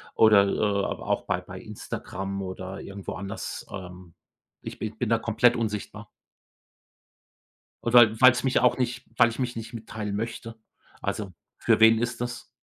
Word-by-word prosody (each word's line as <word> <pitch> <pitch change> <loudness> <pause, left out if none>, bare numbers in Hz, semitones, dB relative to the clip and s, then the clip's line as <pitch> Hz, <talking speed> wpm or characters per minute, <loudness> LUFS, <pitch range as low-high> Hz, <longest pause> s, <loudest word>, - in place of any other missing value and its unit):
Oder, 105 -3 +6
äh, 100 0 0 0.2
auch - - -1
bei - - 0
bei - - -10
Instagram 95 +1 -6
oder 95 +1 -6
irgendwo 100 0 -7
anders, 95 +5 -6
ähm, 90 -2 -9 0.5
ich - - -8
ich 110 0 -4
bin 120 -2 -2
da 115 - +4
komplett 115 +2 +3
unsichtbar. 105 -3 -4 1.7
Oder 115 -2 +5
weil's 125 0 +6
mich 130 - +2
auch 125 - +3
nicht 125 0 -2
weil 115 - +6
ich 115 - -9
mich 125 -2 -2
nicht 115 +2 -7
mitteilen 110 -3 -5
möchte 115 +1 -5 0.4
also, 100 -4 -3 0.3
für - - +2
wen 110 0 +7
ist 120 0 -3
das? 120 -1 -5
110 Hz, 150 wpm, -26 LUFS, 100-120 Hz, 1.7 s, wen